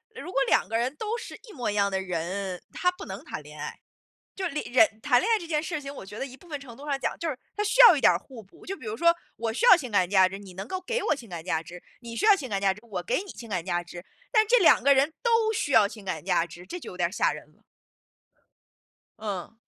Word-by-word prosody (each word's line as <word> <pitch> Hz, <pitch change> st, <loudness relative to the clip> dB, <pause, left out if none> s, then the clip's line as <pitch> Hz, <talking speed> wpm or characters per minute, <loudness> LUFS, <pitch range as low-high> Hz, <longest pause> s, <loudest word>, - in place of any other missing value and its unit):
如 365 Hz, -4 st, -7 dB
果 275 Hz, -, +1 dB
两 200 Hz, -, +3 dB
个 225 Hz, -, 0 dB
人 255 Hz, +5 st, -1 dB
都 440 Hz, +2 st, -2 dB
是 465 Hz, -, -8 dB, 0.2 s
一 -, -, -10 dB
模 245 Hz, -7 st, -2 dB
一 -, -, -4 dB
样 200 Hz, -1 st, +2 dB
的 190 Hz, -, 0 dB
人， 180 Hz, +1 st, -4 dB
他 360 Hz, 0 st, +1 dB
不 360 Hz, -, -10 dB
能 -, -, -7 dB
谈 -, -, -6 dB
恋 -, -, -13 dB
爱。 -, -, -6 dB, 0.6 s
就 385 Hz, -, -3 dB
是 -, -, -7 dB
里 300 Hz, -, -1 dB
人 250 Hz, -4 st, +4 dB
谈 255 Hz, -3 st, +4 dB
恋 445 Hz, -, -1 dB
爱 445 Hz, -, +5 dB
这 340 Hz, -, -8 dB
件 305 Hz, -2 st, 0 dB
事 315 Hz, -2 st, -4 dB
情 275 Hz, 0 st, -7 dB
我 195 Hz, -, -9 dB
觉 205 Hz, +3 st, -10 dB
得 270 Hz, -, -3 dB
一 260 Hz, 0 st, -11 dB
部 355 Hz, -, -19 dB
分 295 Hz, -3 st, -5 dB
程 240 Hz, -4 st, -12 dB
度 285 Hz, -, -10 dB
上 280 Hz, -1 st, 0 dB
讲， -, -, -2 dB
就 335 Hz, -, -3 dB
是 275 Hz, -5 st, -3 dB, 0.2 s
它 420 Hz, -, +1 dB
需 -, -, +4 dB
要 425 Hz, -9 st, +10 dB
一 -, -, -3 dB
点 -, -, +6 dB
儿 -, -, +1 dB
互 250 Hz, -5 st, -12 dB
补。 195 Hz, -, -19 dB
就 390 Hz, +1 st, -4 dB
比 230 Hz, -, -12 dB
如 215 Hz, +1 st, -3 dB
说， 335 Hz, +6 st, +4 dB, 0.2 s
我 225 Hz, 0 st, -2 dB
需 475 Hz, -, 0 dB
要 435 Hz, -, +10 dB
情 255 Hz, -9 st, -5 dB
感 185 Hz, -3 st, +3 dB
价 190 Hz, -2 st, +5 dB
值， 195 Hz, -, -7 dB
你 190 Hz, -3 st, -12 dB
能 195 Hz, +4 st, -7 dB
够 375 Hz, -, -3 dB
给 475 Hz, +6 st, -2 dB
我 305 Hz, -, +2 dB
情 240 Hz, -5 st, -11 dB
感 170 Hz, -2 st, -6 dB
价 165 Hz, -3 st, -1 dB
值， 175 Hz, +1 st, -11 dB, 0.2 s
你 230 Hz, -1 st, -8 dB
需 -, -, -3 dB
要 415 Hz, -, +8 dB
情 280 Hz, -8 st, -6 dB
感 200 Hz, -1 st, -1 dB
价 195 Hz, -1 st, +3 dB
值， 210 Hz, -, -14 dB
我 195 Hz, -5 st, -4 dB
给 -, -, 0 dB
你 395 Hz, -, -9 dB
情 230 Hz, -2 st, -11 dB
感 180 Hz, -3 st, -2 dB
价 175 Hz, -2 st, 0 dB
值。 175 Hz, +1 st, -10 dB, 0.3 s
但 435 Hz, -2 st, +4 dB
这 -, -, +5 dB
两 360 Hz, -, +5 dB
个 280 Hz, 0 st, +6 dB
人 275 Hz, +4 st, +3 dB
都 455 Hz, -2 st, +3 dB
需 290 Hz, -, -2 dB
要 210 Hz, -2 st, +6 dB
情 205 Hz, -2 st, -12 dB
感 160 Hz, -4 st, -4 dB
价 175 Hz, -2 st, +2 dB
值， 175 Hz, +1 st, -12 dB
这 355 Hz, -, -6 dB
就 -, -, -9 dB
有 180 Hz, -, -11 dB
点 175 Hz, 0 st, 0 dB
吓 -, -, +2 dB
人 -, -, -9 dB
了。 -, -, -31 dB, 1.6 s
嗯。 205 Hz, 0 st, -5 dB
240 Hz, 315 characters per minute, -27 LUFS, -, 1.6 s, 要